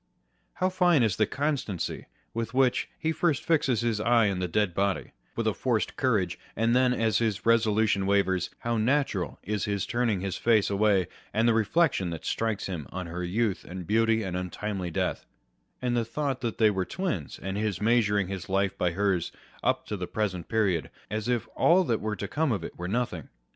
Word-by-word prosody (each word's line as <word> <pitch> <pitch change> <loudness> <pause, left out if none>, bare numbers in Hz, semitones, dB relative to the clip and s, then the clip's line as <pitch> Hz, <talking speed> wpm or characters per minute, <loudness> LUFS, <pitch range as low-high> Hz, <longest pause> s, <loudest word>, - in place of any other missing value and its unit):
1 185 - +1
How - - +4
fine 180 -7 +3
is 110 -5 +1
the 110 - +3
constancy 140 - -2 0.3
with 115 +1 -3
which 130 -2 +2
he 160 - 0
first 160 -2 +1
fixes 135 -8 +2
his 115 -3 0
eye 115 -2 +3
on 95 - -3
the 90 - -1
dead 100 +1 +1
body, 100 +1 -1 0.2
with - - -1
a - - +2
forced - - -1
courage, - - 0 0.2
and 115 +2 +2
then, 130 0 +4
as 115 -4 +1
his 110 -4 -1
resolution 110 -3 +3
wavers, 95 -3 +2
how 120 0 0
natural 110 - 0
is 105 0 -2
his 100 -2 -1
turning 120 -6 0
his 95 -1 -3
face 110 -4 +3
away, 100 -3 +3 0.3
and 110 +2 +3
the 120 - +5
reflection 115 - +2
that 85 -2 -6
strikes 110 -3 -1
him 85 -8 -5
on 90 0 -4
her 85 +2 -5
youth 100 +3 0
and 90 0 -7
beauty 115 +2 +2
and 95 -2 -3
untimely 90 +1 -3
death, 80 - -2 0.6
and 125 -1 +1
the 120 - +2
thought 135 +3 -2
that 115 -3 -3
they 110 -2 +5
were 95 -2 -1
twins, 105 - -3
and 95 0 -4
his 105 -3 -1
measuring 105 -3 +2
his 95 -2 -6
life 95 0 +1
by 90 -2 +1
hers 95 -2 0 0.3
up - - +1
to 105 - -4
the 90 -2 -4
present 95 -5 -2
period, 100 -7 +1 0.2
as 110 +1 -2
if 120 -2 0
all 185 +3 +5
that 115 -9 0
was 105 0 -2
to 100 - -4
come 155 +3 0
of 100 -7 -1
it - - -7
were 90 - -5
nothing 100 - -2
105 Hz, 200 wpm, -28 LUFS, 95-120 Hz, 0.6 s, the